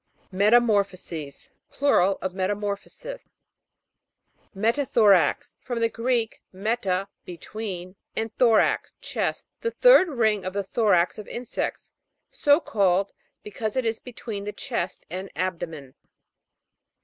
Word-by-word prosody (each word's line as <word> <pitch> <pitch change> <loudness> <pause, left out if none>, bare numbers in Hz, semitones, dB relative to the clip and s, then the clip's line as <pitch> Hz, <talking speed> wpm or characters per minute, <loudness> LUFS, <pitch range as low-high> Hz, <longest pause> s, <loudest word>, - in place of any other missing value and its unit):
METAMOR'PHOSES. 200 - +1 0.2
Plural 200 -9 +2
of 190 - -2
Meta 190 +2 0
morphosis. 210 - -6 1.3
ME'TATHORAX. 215 - +3
From 245 -2 -3
the 230 0 +2
Greek, 230 -1 -1
meta, 195 -1 -1 0.2
between, 185 0 -7 0.2
and 220 0 -3
thorax, 230 -4 +3
chest. - - -3
The 465 - -1
third - - +6
ring 220 - +1
of 185 - -4
the 200 0 -1
thorax 190 -3 +2
of 210 - -8
insects, 245 0 -4 0.4
so 290 +1 +4
called, 195 - +1 0.3
because 210 +1 -4
it 260 -2 0
is 225 0 -1
be 250 - -10
tween 210 -4 -6
the 210 - -3
chest 230 -9 -4
and 185 +2 -5
abdomen. 165 -7 -4
205 Hz, 115 wpm, -25 LUFS, 185-235 Hz, 1.3 s, third